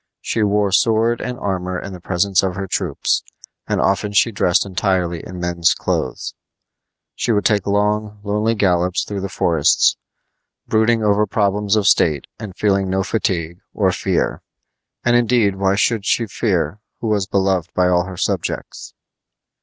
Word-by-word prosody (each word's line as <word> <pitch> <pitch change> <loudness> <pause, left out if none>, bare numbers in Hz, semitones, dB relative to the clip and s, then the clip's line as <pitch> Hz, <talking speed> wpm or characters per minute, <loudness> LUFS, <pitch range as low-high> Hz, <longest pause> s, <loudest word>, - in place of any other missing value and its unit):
She 115 - -2
wore 105 -1 +2
sword 115 +3 +2
and 125 0 -4
armor 90 -3 -3
in 100 - -7
the 90 - -8
presence 95 +2 +1
of 95 -2 -2
her 95 - -3
troops, 95 - -1 0.5
and - - 0
often 100 +1 0
she 115 +3 +3
dressed 90 -4 +2
entirely 90 -3 -1
in 90 0 -8
men's 85 -1 +1
clothes. - - -3 0.8
She 120 - -1
would 105 -2 +1
take 105 -3 +2
long, 105 +1 0
lonely 105 +2 0
gallops 90 -2 +1
through 100 -2 -5
the 100 - -4
forests, 85 -3 +2 0.7
brooding 110 +1 +2
over 105 0 +2
problems 105 0 +1
of 105 -2 +1
state 80 -8 +3
and 105 -5 -8
feeling 100 -2 +1
no 95 +1 0
fatigue 90 -5 -2 0.2
or - - +2
fear. - - -1 0.6
And 120 0 +4
indeed 120 -5 +2
why 95 0 +1
should 110 +1 +1
she 115 - +1
fear, 95 -4 -1 0.2
who 115 - -2
was 100 -3 0
beloved 95 -4 0
by 90 0 +3
all 90 0 +2
her 95 -1 -8
subjects? - - -3
100 Hz, 160 wpm, -19 LUFS, 90-105 Hz, 0.8 s, And